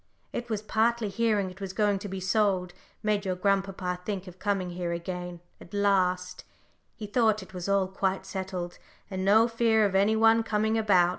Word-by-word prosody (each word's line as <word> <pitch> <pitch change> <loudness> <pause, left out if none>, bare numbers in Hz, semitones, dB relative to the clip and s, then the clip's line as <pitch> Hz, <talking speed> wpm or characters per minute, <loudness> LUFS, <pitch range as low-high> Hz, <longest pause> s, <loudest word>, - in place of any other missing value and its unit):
It 240 0 -4
was 215 -2 -2
partly 225 0 +1
hearing 210 -3 +1
it 185 +2 -15
was 190 -1 -5
going 205 -1 +1
to 205 - -6
be 190 0 -5
sold, 190 -2 +1 0.3
made 210 -1 +1
your 185 -2 -1
grandpapa 190 -1 0
think 195 -1 -4
of 180 -1 -12
coming 195 -3 -1
here 175 -1 -3
again 175 0 -5 0.2
at 190 - -11
last 185 -3 +1 0.5
he 215 - -7
thought 215 -1 +2
it 190 - -16
was 180 +1 -5
all 200 -1 +2
quite 190 0 -1
settled, 190 -2 -5 0.3
and 190 0 -3
no 220 +4 +5
fear 230 -2 +3
of 200 - 0
any 200 +3 +3
one 225 +1 +5
coming 220 0 0
about. 195 -6 +4
195 Hz, 190 wpm, -28 LUFS, 185-215 Hz, 0.5 s, no